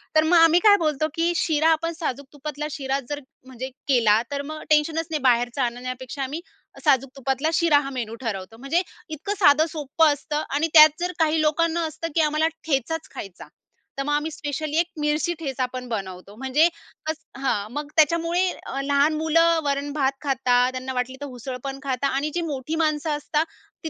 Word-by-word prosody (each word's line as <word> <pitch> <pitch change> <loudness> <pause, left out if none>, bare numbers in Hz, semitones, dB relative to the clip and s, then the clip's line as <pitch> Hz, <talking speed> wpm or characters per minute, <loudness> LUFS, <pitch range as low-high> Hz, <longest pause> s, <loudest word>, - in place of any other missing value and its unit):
तर 310 - +6
मग 340 +2 +4
आम्ही 330 +1 +6
काय 415 -1 +8
बोलतो 305 0 +1
की 335 +1 +2
शिरा, 315 -1 +2
आपण 330 +1 0
साजूक 280 -3 -3
तुपातला 300 +1 -5
शिरा 275 -2 -2
जर 290 0 -3 0.3
म्हणजे 260 0 -7 0.2
केला, 225 -5 +4
तर 280 0 -2
मग 310 +2 -7
टेन्शनच 315 +2 +2
नाही, 305 -3 -1
बाहेरचा 245 +1 +2
आणण्यापेक्षा 255 +3 -4
आम्ही 295 +6 -4 0.4
साजूक 265 0 +3
तुपातला 270 +3 0
शिरा 320 -4 +4
हा 275 -1 -4
मेनू 235 -4 -4
ठरवतो. 210 0 -5
म्हणजे 275 +8 0 0.3
इतकं 315 +7 -4
साधं-सोपं 305 -1 +3
असतं. 300 +1 -3
आणि 295 +4 +1
त्यात 310 0 +8
जर 355 +1 -1
काही 315 0 +3
लोकांना 330 +2 +1
असतं, 315 +2 -5
की 325 - +4
आम्हाला 305 +1 +2 0.2
ठेचाच 315 +3 -1
खायचा. 195 -3 -8 0.5
तर - - 0
मग 295 +1 -1
आम्ही 300 +2 0
स्पेशली 300 +1 -4
1 340 0 +3
मिरची 300 +4 +1
ठेचा 265 -4 -2
पण 250 -1 -5
बनवतो. 195 -2 -6
म्हणजे 265 +6 +3 0.4
अस 315 - 0 0.3
हां, 215 -5 -1
मग 295 0 -4
त्याच्यामुळे 335 +3 +3 0.2
अ 275 - -3
लहान 285 +2 +2
मुलं 330 +1 +3
वरण-भात 280 -1 0
खातात, 255 -3 +2
त्यांना 260 0 -5
वाटली 250 +1 -2
तर - - -3
उसळ 250 +2 -5
पण 270 0 -5
खातात. 275 0 0
आणि 280 +3 -1
जी 345 - 0
मोठी 280 +3 -3
माणसं 305 0 0
असता, 300 +1 0 0.4
ती 320 - -3
290 Hz, 180 wpm, -24 LUFS, 260-315 Hz, 0.5 s, काय